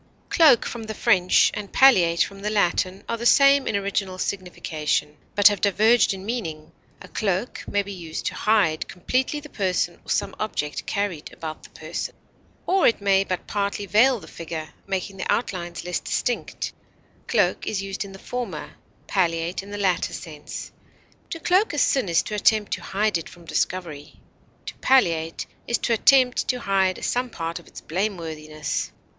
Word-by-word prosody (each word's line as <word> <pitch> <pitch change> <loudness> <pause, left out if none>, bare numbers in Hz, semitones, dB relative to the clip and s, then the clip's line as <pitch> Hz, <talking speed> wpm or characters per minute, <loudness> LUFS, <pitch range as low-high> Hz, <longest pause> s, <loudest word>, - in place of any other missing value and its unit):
Cloak, 300 -8 +6
from 235 - -5
the 220 0 -5
French, 185 -6 +4
and 205 -1 -6
palliate, 175 -11 +5
from 195 -1 -8
the 205 +1 -2
Latin, 190 -2 +1
are 230 - -2
the 235 - -5
same 275 +1 +6
in - - 0
original 200 -1 -1
signification, 160 -6 -2 0.2
but 205 -1 +7
have 205 -2 -3
diverged 215 +3 +4
in 190 0 -6
meaning; 165 -10 -4 0.3
a - - -11
cloak 200 +2 -2
may 205 0 +1
be 200 0 -7
used 165 -4 -6
to - - -1
hide 200 -8 +2
completely 255 - -1
the 300 - -11
person 185 - -1
or - - -15
some - - 0
object 150 -9 -3
carried 200 -7 -2
about 155 -1 -7
the - - -14
person, - - -6 0.5
or 380 0 +4
it 230 - +2
may 195 -1 +3
but 185 -2 -4
partly 200 0 -2
veil 235 +5 +4
the 160 - -13
figure, 160 -2 -6 0.2
making 195 0 -3
the 185 - -1
outlines 175 -6 -2
less 180 -1 -1
distinct; 245 - -2 0.5
cloak - - +1
is 195 -2 -1
used 195 +1 -4
in 200 - -10
the 195 - -10
former, 205 -8 -5 0.3
palliate, 170 -2 0
in 195 - -12
the 205 - -5
latter 185 -4 0
sense; 155 -3 -8 0.6
to 330 - -5
cloak 370 +5 +2
a - - -3
sin 265 -7 +2
is 165 - +3
to - - -6
attempt 210 0 +2
to - - -3
hide 205 -2 0
it 165 - -9
from 170 -1 -15
discovery; 165 -4 -3 0.5
to - - -5
palliate 165 -11 +2 0.2
it - - -4
is - - +5
to 235 - 0
attempt 255 +2 +4
to 250 -1 -1
hide 190 -2 +1
some 250 +1 0
part 165 -6 -4
of - - -18
its - - -11
blameworthiness. 160 -5 -3
195 Hz, 175 wpm, -24 LUFS, 170-220 Hz, 0.6 s, but